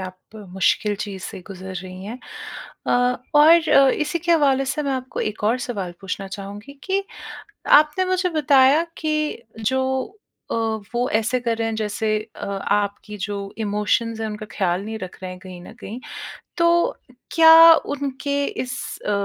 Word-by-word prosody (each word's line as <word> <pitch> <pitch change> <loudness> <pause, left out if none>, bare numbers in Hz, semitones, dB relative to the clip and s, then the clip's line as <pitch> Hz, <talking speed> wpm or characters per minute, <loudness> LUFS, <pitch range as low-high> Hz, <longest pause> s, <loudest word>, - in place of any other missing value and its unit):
आप 185 -1 -7 0.3
मुश्किल 190 +3 +1
चीज़ 200 -2 -6
से - - -7
गुज़र 190 -1 -8
रही 185 +1 -8
हैं 225 +5 -7 0.7
अ, - - +2 0.4
और 320 +2 +6
अ, 275 -1 +6
इसी 300 +4 -1
के 340 +1 +1
हवाले 275 -4 +3
से 265 +3 -2
मैं 280 -2 -1
आपको 260 -1 -4
एक 215 0 -3
और 230 +4 +2
सवाल 205 -8 -4
पूछना 195 +1 -5
चाहूँगी 205 +7 -8
कि 390 +1 0 0.8
आपने 305 +5 -1
मुझे 370 0 0
बताया 290 -2 +4 0.2
कि 305 -5 -1 0.2
जो 260 +5 +1 0.7
अ, - - -1 0.4
वो 245 +1 +1
ऐसे 225 +3 +1
कर 235 -2 -1
रहे 225 0 0
हैं 225 - -3
जैसे 215 0 -1 0.2
अ, - - -6
आपकी 200 +1 -2
जो 205 -1 -4 0.2
इमोशंस 220 +2 0
हैं, 220 - -1
उनका 215 0 -7
ख़याल 185 -1 0
नहीं 220 +1 -5
रख 185 -3 -8
रहे 185 - -5
हैं 180 - -11
कहीं 185 -1 -10
न - - -11
कहीं, 225 +5 -7 0.6
तो 340 +7 +3 0.4
क्या 330 0 +9 0.2
उनके 280 0 -2
इस 255 0 -4 0.3
अ, - - +1
230 Hz, 165 wpm, -22 LUFS, 205-295 Hz, 0.8 s, क्या